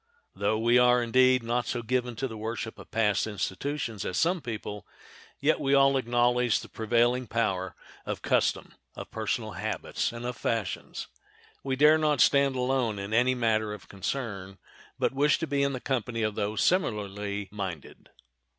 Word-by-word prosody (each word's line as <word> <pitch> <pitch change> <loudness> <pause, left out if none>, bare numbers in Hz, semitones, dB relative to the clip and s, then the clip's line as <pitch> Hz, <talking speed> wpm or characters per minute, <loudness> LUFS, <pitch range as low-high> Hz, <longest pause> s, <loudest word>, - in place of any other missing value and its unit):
Though 105 +2 0
we 120 +2 +4
are, 125 0 +5
indeed, 130 +1 +4
not 120 +1 -1
so 120 -1 -2
given 125 0 -1
to 135 +4 -2
the 115 - -8
worship 110 +1 -5
of - - -12
past 110 -2 +1
institutions 110 +2 -3
as 90 - -3
some 175 +1 +2
people, 105 -4 -6 0.5
yet - - +2
we 140 +1 +2
all 135 0 +5
acknowledge 120 -1 +2
the - - -11
prevailing 120 +2 +1
power 95 -6 -1 0.3
of - - -5
custom, - - +1 0.2
of - - -8
personal - - -2
habits, - - -3
and 120 +1 -7
of 125 0 -3
fashions. 110 -6 -3 0.6
We 135 -1 -1
dare 150 +3 +6
not 150 -3 +1
stand 140 -1 +4
alone 125 -4 0
in 100 +2 -5
any 125 +3 +3
matter 110 -3 +1
of 105 - -15
concern, 100 -3 -4 0.4
but - - 0
wish 145 +2 +3
to 165 - -2
be 140 -2 0
in 140 -2 0
company 120 -3 -2
of 110 -1 0
those 105 +2 -1
similarly 105 - -1
minded. 95 -7 -7
120 Hz, 165 wpm, -28 LUFS, 105-130 Hz, 0.6 s, dare